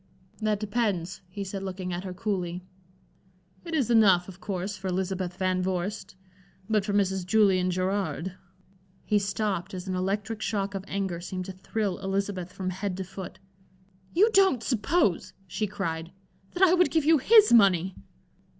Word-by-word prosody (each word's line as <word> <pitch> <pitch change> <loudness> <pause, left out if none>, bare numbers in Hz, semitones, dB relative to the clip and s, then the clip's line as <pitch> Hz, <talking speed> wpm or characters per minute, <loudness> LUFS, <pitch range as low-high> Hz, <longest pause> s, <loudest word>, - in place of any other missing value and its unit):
"That 215 -2 0
depends," 200 -5 -1
he 200 +2 -5
said, 195 0 -5
looking 185 -1 -4
at 175 +2 -4
her 185 - -4
coolly. 180 -3 -3 1.0
"It 335 -2 -4
is 260 -6 +1
enough, 195 -6 +5
of 190 -1 -11
course, 195 0 -3
for 195 -1 -6
Elizabeth 185 -1 -2
Van 185 -1 0
Vorst, 190 +2 -3 0.5
but 215 -2 +2
for 205 - -2
Mrs. 190 -2 +1
Julian 185 -1 +3
Gerard" 185 0 -1 0.7
He 210 - +3
stopped 200 -2 -2
as 180 +1 -7
an 185 - -2
electric 200 +4 -2
shock 200 -2 -1
of 195 -1 -4
anger 190 -4 -2
seemed 185 +1 -5
to 190 - -6
thrill 195 +1 -3
Elizabeth 195 -2 -2
from 185 -1 -4
head 190 0 -3
to 190 - -3
foot. 190 0 -8 0.7
"You 420 +6 +4
don't 380 - +4
suppose," 240 - +1
she 210 +4 -2
cried, 170 -5 -4 0.4
"that 360 - +1
I 360 -2 +7
would 360 -1 +4
give 320 -3 +1
you 320 -1 +5
his 425 - +6
money?" 190 -5 +5
195 Hz, 160 wpm, -27 LUFS, 185-210 Hz, 1.0 s, I